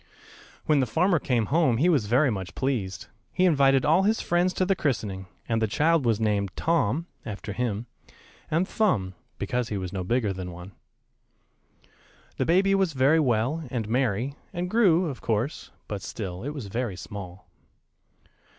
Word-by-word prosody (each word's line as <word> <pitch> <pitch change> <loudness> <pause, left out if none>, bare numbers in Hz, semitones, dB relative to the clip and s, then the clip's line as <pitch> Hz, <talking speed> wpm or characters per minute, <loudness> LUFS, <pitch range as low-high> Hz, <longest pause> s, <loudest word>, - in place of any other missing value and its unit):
When 150 -2 +3
the 130 - +1
farmer 170 - +2
came 120 -5 0
home 155 -8 +3
he 155 +8 +3
was 145 -12 +2
very 130 +5 +3
much 95 -4 -5
pleased. 115 -9 -2 0.3
He 185 - +2
invited 135 -5 +4
all 160 +5 +4
his 215 +3 +2
friends 175 +1 +1
to 185 - +1
the 195 +1 +2
christening, 105 - -2 0.2
and 115 -1 0
the 110 - +2
child 150 +3 +2
was 115 -2 +2
named 105 -3 +1
"Tom," 165 -2 +1 0.2
after 105 -1 -6
him, 110 0 -2 0.6
and 170 +4 +1
"Thumb," 115 - 0 0.2
because 125 -2 -2
he 105 - -2
was 95 -1 -5
no 95 -2 -2
bigger 110 +1 0
than 90 -1 -6
one. 90 +3 -10 1.7
The - - 0
baby 190 +4 +4
was 190 -4 +2
very 135 +4 +4
well, 130 +3 +1
and 120 -4 -3
merry, 125 +1 0 0.2
and 180 0 -4
grew, 185 -6 +4
of 140 -6 -5
course; 115 +5 -2 0.2
but 105 -2 -4
still 95 -4 -6
it 140 - -3
was 145 -6 -6
very 115 0 -3
small. 95 -1 -9
125 Hz, 170 wpm, -26 LUFS, 105-160 Hz, 1.7 s, invited